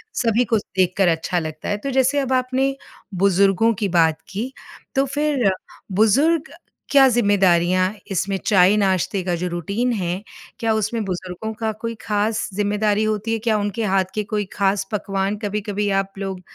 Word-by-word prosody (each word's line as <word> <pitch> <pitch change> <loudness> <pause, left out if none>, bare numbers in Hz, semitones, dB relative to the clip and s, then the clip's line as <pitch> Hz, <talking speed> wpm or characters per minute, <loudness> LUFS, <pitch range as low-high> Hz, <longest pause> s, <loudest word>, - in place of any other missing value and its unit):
सभी 230 0 +2
को 230 -1 +2
देखकर 190 -1 0
अच्छा 165 +1 0
लगता 155 -1 -6
है, 205 - 0
तो 275 +7 -5
जैसे 265 +2 +2
अब 265 -2 -1
आपने 260 +1 +1 0.4
बुजुर्गों 195 +4 +3
की 205 - 0
बात 165 -3 +2
की, 230 +7 -4 0.4
तो 270 +1 +3
फिर 280 -5 +1 0.4
बुज़ुर्ग 275 - +3 0.4
क्या 275 -2 +7
जिम्मेदारियाँ 185 -4 +3 0.2
इसमें 195 +1 -1
चाय-नाश्ते 190 -1 +3
का 175 -1 -1
जो 180 +2 -3
रुटीन 200 +9 -1
है, 180 -2 -2 0.4
क्या 225 -1 +1
उसमें 220 +1 -1
बुजुर्गों 185 +3 -5
का 220 0 -2
कोई 230 0 -3
ख़ास 210 +1 -1
ज़िम्मेदारी 205 +1 +1
होती 215 +1 -1
है? 225 - -1
क्या 220 -1 +1
उनके 205 +3 -2
हाथ 190 -2 +2
की 215 - 0
कोई 210 -1 -2
ख़ास 195 0 0
पकवान 195 0 -1
कभी-कभी 205 0 -2
आप 195 0 -11
लोग 190 -2 -4
205 Hz, 160 wpm, -21 LUFS, 190-230 Hz, 0.4 s, क्या